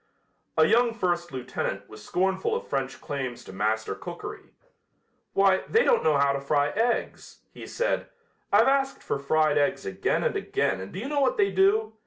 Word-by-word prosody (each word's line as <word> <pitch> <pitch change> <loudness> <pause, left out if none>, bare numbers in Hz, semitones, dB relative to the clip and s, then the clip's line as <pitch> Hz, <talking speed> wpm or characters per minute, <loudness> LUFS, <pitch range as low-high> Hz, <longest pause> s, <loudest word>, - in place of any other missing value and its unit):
A 160 - +6
young 235 +5 +3
first 175 -5 -1
lieutenant 130 -2 -4
was 110 -1 -12
scornful 190 - 0
of - - -4
French 135 -1 -3
claims 130 -4 -5
to - - -11
master 110 +3 -1
cookery. - - -8 0.8
"Why, 195 -1 +3
they 455 +2 +4
don't 485 - +3
know 150 -2 +3
how 140 0 +3
to 140 - -3
fry 145 +1 +1
eggs," 235 +3 -2
he - - -10
said. - - -1 0.4
"I've 210 +4 +5
asked 270 0 +1
for - - -2
fried 150 +1 +2
eggs 140 -1 0
again 95 - -1
and - - 0
again 95 0 -1
and 95 - -8
do - - -8
you 225 +7 -4
know 290 0 0
what 260 -2 +2
they 200 -1 +3
do? 205 +3 +2
175 Hz, 185 wpm, -26 LUFS, 140-220 Hz, 0.8 s, A